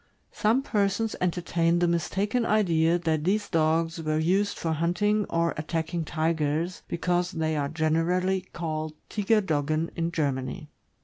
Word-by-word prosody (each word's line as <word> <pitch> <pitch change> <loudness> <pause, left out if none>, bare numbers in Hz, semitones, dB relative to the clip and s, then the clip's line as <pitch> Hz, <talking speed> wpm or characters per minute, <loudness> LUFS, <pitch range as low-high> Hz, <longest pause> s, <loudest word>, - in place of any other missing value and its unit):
Some 230 +5 +1
persons 210 -1 0
entertain 175 -1 +1
the 175 0 +2
mistaken 195 +7 0
idea 170 -7 +3
that 160 -3 -1
these 205 +4 +1
dogs 165 0 +1
were 155 -1 0
used 190 +6 +1
for 165 - -2
hunting 180 +6 +1
or 170 0 +1
attacking 160 +2 -2
tigers, 160 +2 -1
because 175 +1 0
they 160 -1 -1
are 140 -1 -1
generally 165 +4 +1
called 155 -2 -4
Tiger 215 +1 +2
doggen 155 -2 -1
in 170 0 -1
Germany. 145 0 -2
170 Hz, 135 wpm, -27 LUFS, 160-185 Hz, -, idea